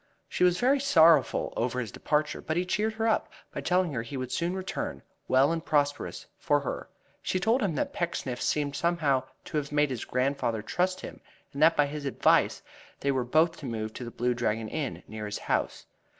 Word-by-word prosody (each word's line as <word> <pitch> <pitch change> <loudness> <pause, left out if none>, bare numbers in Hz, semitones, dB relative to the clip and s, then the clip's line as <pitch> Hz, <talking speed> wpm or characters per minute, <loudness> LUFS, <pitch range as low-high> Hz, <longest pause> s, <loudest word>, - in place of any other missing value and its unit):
She - - -1
was 180 0 +4
very 270 +3 +3
sorrowful 165 - +4
over 125 +2 -1
his 115 -5 -4
departure, 150 0 -1
but 160 - -2
he 180 - +1
cheered 215 +4 0
her 220 0 +2 0.3
by - - -4
telling 180 -3 +1
her 115 - -1
he 120 +4 -6
would 130 -1 -4
soon 175 +2 -1
return, 285 +10 -4 0.2
well 135 +4 +4
and 165 -1 -2
prosperous, 145 -3 0
for 145 0 +2
her. 135 - -5 0.3
She 185 - -1
told 225 +7 +2
him 190 -7 0
that - - -2
Pecksniff 135 -8 -3
seemed 145 -1 0
somehow 160 -6 +1 0.2
to - - -3
have 145 -1 -2
made 150 -1 +2
his 125 - -3
grandfather 125 -4 -1
trust 185 +8 0
him, - - -8 0.3
and 140 - -5
that 160 +2 +6
by 145 - +5
his 145 0 -5
advice 135 - +2 0.4
they 140 - +1
were 130 -2 0
both 160 +7 +2
to 140 - -7
move 110 -2 -4
to - - -7
The 120 - -5
Blue 125 +1 0
Dragon 115 -2 -1
Inn, 150 -4 -4
near 110 -1 -6
his 105 - -4
house. - - -2
145 Hz, 205 wpm, -28 LUFS, 125-175 Hz, 0.4 s, that